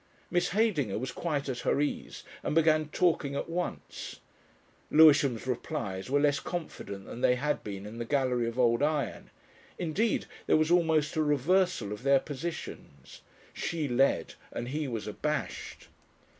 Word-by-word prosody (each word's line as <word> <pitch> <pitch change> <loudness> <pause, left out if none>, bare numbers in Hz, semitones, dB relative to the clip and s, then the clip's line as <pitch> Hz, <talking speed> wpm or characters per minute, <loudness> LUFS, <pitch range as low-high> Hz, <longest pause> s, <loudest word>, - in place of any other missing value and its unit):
Miss 175 0 +2
Heydinger 180 - +1
was 125 +3 -3
quite 150 -5 -2
at 125 -2 -3
her 135 - +1
ease 145 - -3 0.2
and - - -2
began 155 -1 +4
talking 160 -5 +1
at - - -2
once. 175 +1 -5 0.7
Lewisham's 145 -6 +6
replies 120 -6 -3
were 145 +2 +3
less 145 0 +3
confident 100 - -6
than 120 - -8
they 125 - +4
had 150 +4 -1
been 100 -1 -6
in 110 +3 -8
the 120 - -3
Gallery 125 -3 +1
of 115 +1 -5
Old 120 -1 +3
Iron; 145 -5 -1 0.5
indeed 185 +7 0 0.2
there - - +5
was 155 +1 +2
almost 160 -4 +3
a - - +3
reversal 150 - +2
of 105 - -8
their 135 +1 +4
positions. 145 - -7 0.3
She 160 -3 -2
led 135 +2 +2 0.2
and 120 - -4
he 150 +2 -2
was 115 -4 -4
abashed. - - -4
145 Hz, 155 wpm, -30 LUFS, 125-160 Hz, 0.7 s, Lewisham's